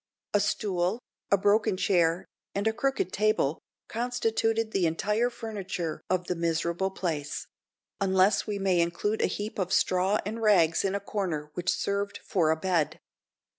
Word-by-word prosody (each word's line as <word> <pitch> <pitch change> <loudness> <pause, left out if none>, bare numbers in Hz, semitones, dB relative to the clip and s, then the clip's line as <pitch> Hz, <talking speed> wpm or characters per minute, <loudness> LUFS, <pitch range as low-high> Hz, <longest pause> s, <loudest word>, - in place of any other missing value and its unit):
A 205 - +4
stool, 195 -1 0 0.3
a 200 - +5
broken 205 +1 +2
chair, 175 -2 +2 0.3
and 200 +1 -1
a 220 - +2
crooked 240 -6 -1
table, 210 -8 +1 0.3
constituted 225 -2 0
the 185 -5 +2
entire 210 +9 +1
furniture 195 -8 -5
of 185 -1 +1
the 180 - -1
miserable 170 +2 0
place; 160 -6 -3 0.5
unless 190 0 +3
we 210 -1 -2
may 190 -3 +2
include 190 +6 0
a - - +3
heap 210 +1 -4
of 185 -1 -1
straw 185 +2 +3
and 220 +3 -4
rags 175 -7 +4
in 195 0 0
a - - 0
corner, 175 -7 -3
which 180 0 -2
served 200 0 -1
for 170 -5 +2
a 160 - +4
bed. 170 -3 0
195 Hz, 155 wpm, -28 LUFS, 175-210 Hz, 0.5 s, a